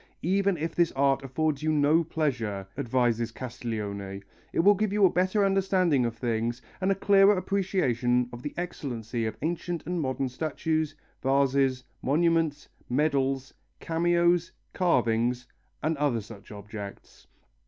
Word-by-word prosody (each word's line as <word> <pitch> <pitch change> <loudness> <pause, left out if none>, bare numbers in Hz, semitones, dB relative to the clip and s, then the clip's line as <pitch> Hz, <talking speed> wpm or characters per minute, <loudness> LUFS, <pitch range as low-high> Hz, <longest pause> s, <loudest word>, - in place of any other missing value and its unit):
"Even 195 +1 +2
if 165 +2 -3
this 170 -1 +2
art 135 0 +2
affords 145 +2 -1
you 155 0 +1
no 155 +2 +3
pleasure," 120 - -2
advises 120 -3 0
Castiglione, 105 -6 -5 0.3
"it - - +2
will 200 +4 +7
give 210 0 -1
you 205 -1 +4
a 185 - +4
better 185 +3 +2
understanding 185 -9 +2
of 115 -1 -6
things, 115 0 -1 0.2
and 190 +1 +2
a - - +2
clearer 195 +1 +5
appreciation 130 - +1
of 120 - -7
the 145 - -6
excellency 120 -9 -3
of 110 - -5
ancient 170 0 -2
and 175 +1 -2
modern 130 -1 -1
statues, 155 +3 -2 0.3
vases, 135 -1 +2 0.2
monuments, 160 0 +1 0.2
medals, 135 -1 0 0.3
cameos, 175 +1 +2 0.2
carvings, 120 -7 +1 0.4
and 160 +2 +1
other 140 -6 +1
such 105 -1 -13
objects." 105 -1 -9
140 Hz, 135 wpm, -27 LUFS, 120-170 Hz, 0.4 s, will